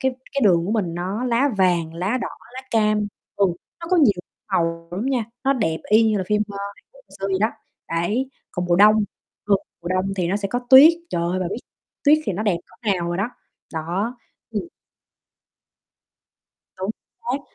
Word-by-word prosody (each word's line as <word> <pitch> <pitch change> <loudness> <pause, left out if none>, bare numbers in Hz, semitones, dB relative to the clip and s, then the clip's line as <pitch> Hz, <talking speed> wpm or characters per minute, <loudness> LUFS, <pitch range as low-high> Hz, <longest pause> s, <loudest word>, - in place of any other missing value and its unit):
cái 265 -1 +1 0.2
cái 280 - 0
đường 170 -4 +4
của 205 - -1
mình 190 -7 0
nó 190 +7 -2
lá 250 +3 +2
vàng, 170 -3 +2
lá 190 +9 0
đỏ, - - -2 0.3
lá 260 - -5
cam, 215 -2 +2 0.3
ừ, 200 - +4 0.4
nó 335 - -6
có 365 - +4
nhiều 280 -11 +6 0.4
màu 165 0 0
lắm 195 +8 -3
nha, 260 -4 +1 0.2
nó 270 - +4
đẹp 160 -12 0
y 215 +2 +7
như 210 - +1
là 190 - -2
phim, 210 +1 +2
ơ, 200 -1 -7 0.2
Hàn - - -22
Quốc - - -18
hồi - - -39
xưa 195 - -1
vậy 190 -1 +1
đó, 215 - +4 0.4
đấy. 205 +11 0 0.2
Còn 180 - -3
mùa 175 -1 +3
đông, 210 +3 +7 0.5
thường 200 -1 +5 0.2
mùa 170 - -4
đông 185 +1 0
thì 180 -2 0
nó 190 - +1
sẽ 200 -1 -2
có 245 - 0
tuyết, 275 +5 +10 0.2
trời 170 - -1
ơi, 175 +2 0
bà 185 - 0
biết 205 - -2 0.5
tuyết 300 +1 +6
thì - - -1
nó 195 +4 -2
đẹp 205 -5 +2
cỡ 205 +4 -4
nào 175 -2 -2
rồi 175 - -1
đó, 200 +6 -1 0.4
đó. 180 +9 -2 0.3
Ừm. 215 -2 -2 2.1
Đúng 190 +2 -2 0.4
xác. 265 +3 -1
200 Hz, 205 wpm, -22 LUFS, 175-235 Hz, 2.1 s, tuyết